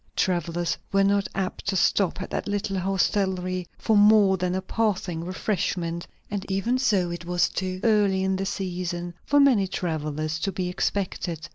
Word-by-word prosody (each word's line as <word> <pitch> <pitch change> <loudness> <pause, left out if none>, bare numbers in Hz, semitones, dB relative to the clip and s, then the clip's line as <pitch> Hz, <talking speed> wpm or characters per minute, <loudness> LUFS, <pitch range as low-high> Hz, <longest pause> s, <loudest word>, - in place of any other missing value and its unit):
Travellers 175 -1 0 0.2
were 195 -1 +4
not 200 0 +2
apt 190 0 -3
to 200 - +1
stop 190 0 +2
at - - -9
that - - -3
little 200 -1 -1
hostelry 185 -1 0
for 220 - +1
more 205 -1 +6
than 180 0 -1
a 190 - -1
passing 190 -5 -1
refreshment; 175 -2 -2 0.2
and 200 -2 -2
even 230 +7 +1
so, 195 -9 +2
it 175 0 -5
was 175 0 +1
too 185 0 -3
early 205 -4 +3
in 190 0 +1
the 195 +1 -2
season 175 -3 -3
for 290 - +3
many 250 -9 +5
travellers 155 -3 -2
to 195 +4 -1
be 185 -1 -2
expected. 180 -3 -2
190 Hz, 165 wpm, -25 LUFS, 175-200 Hz, 0.2 s, more